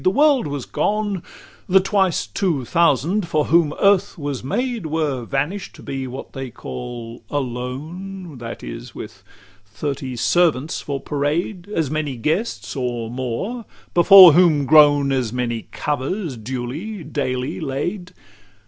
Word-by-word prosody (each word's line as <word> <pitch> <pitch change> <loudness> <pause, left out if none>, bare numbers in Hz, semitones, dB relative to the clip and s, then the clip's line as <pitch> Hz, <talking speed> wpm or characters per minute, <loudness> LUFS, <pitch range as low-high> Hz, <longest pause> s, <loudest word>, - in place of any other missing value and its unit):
The - - +5
world 285 - +3
was 140 -3 -4
gone; 205 -3 -1 0.5
The 190 +1 +6
twice 190 -2 +1
two 165 -10 -1
thousand, 170 - +2
for 150 -2 +1
whom 165 -2 +3
earth 200 -1 +3
was 145 -5 -4
made, 235 - -2
Were 150 -6 -1
vanish'd 150 - -3
to - - -13
be 135 -1 -4
what 130 +2 -8
they 135 -1 -5
call 115 - -8
alone 145 +6 -5
That 115 -1 -7
is, - - -8
with - - -9 0.5
thirty 130 +5 -4
servants 155 +2 +1
for 140 -1 -4
parade, 165 +8 -2
As 160 -9 -1
many 155 -3 -2
guests, 160 - -2
or 120 -3 -3
more; 130 - -4 0.3
before 180 -1 +9
whom 160 -4 +4
groan 145 -1 +6
As 130 -5 0
many 120 -2 -3
covers, 150 +2 -2
duly, 130 - -5
daily, 135 -1 -3
laid. 170 +6 -3
150 Hz, 135 wpm, -21 LUFS, 130-180 Hz, 0.5 s, before